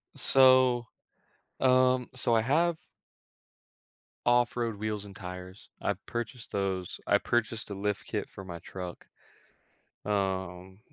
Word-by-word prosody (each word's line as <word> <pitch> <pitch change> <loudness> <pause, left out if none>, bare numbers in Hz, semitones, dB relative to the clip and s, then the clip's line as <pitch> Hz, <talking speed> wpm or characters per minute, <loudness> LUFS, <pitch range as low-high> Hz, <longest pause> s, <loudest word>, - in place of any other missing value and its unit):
So 130 -2 +5 0.7
um, 130 -1 +4
so, 115 - +2
I - - +5
have 160 +7 +2 1.5
off-road 120 -2 +2
wheels 105 -1 -3
and 100 -1 -11
tires. 90 0 -9
I've 100 -1 -2
purchased 120 0 -5
those, 95 -2 -2
I 100 - +5
purchased 115 0 -1
a - - -4
lift 100 0 -2
kit - - -3
for 100 - -10
my 85 -2 -7
truck. 90 0 -8 1.0
Um, 95 -2 -2
105 Hz, 115 wpm, -30 LUFS, 95-120 Hz, 1.5 s, So